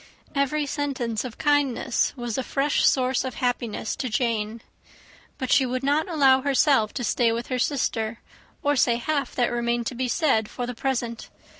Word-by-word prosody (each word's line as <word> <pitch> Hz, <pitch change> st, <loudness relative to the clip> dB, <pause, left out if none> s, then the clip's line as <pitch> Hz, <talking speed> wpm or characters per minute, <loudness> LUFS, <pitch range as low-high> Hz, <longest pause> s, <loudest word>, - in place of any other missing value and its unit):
Every 290 Hz, +1 st, 0 dB
sentence 265 Hz, -6 st, -2 dB
of 250 Hz, -3 st, -7 dB
kindness 285 Hz, -5 st, +1 dB
was 240 Hz, -3 st, -3 dB
a -, -, 0 dB
fresh 280 Hz, +3 st, +1 dB
source 255 Hz, -1 st, +2 dB
of 260 Hz, -1 st, -5 dB
happiness 240 Hz, -3 st, -2 dB
to 255 Hz, -, -3 dB
Jane. 225 Hz, -1 st, -1 dB, 0.7 s
But 260 Hz, -1 st, -3 dB
she 275 Hz, -, +5 dB
would 255 Hz, +1 st, -2 dB
not 295 Hz, +5 st, +1 dB
allow 270 Hz, -5 st, +4 dB
herself 275 Hz, -5 st, +3 dB
to 250 Hz, -, -3 dB
stay 235 Hz, +1 st, +2 dB
with 235 Hz, +1 st, -3 dB
her 255 Hz, -1 st, -1 dB
sister, 230 Hz, -5 st, -1 dB, 0.4 s
or 290 Hz, 0 st, +2 dB
say 240 Hz, -2 st, +3 dB
half 275 Hz, +2 st, -2 dB
that 245 Hz, -2 st, +1 dB
remained 235 Hz, 0 st, -1 dB
to 255 Hz, -, -3 dB
be 255 Hz, +1 st, -2 dB
said, 235 Hz, -6 st, +1 dB
for 245 Hz, -, -4 dB
the 245 Hz, -, -4 dB
present. 235 Hz, -2 st, -3 dB
255 Hz, 175 wpm, -25 LUFS, 235-275 Hz, 0.7 s, she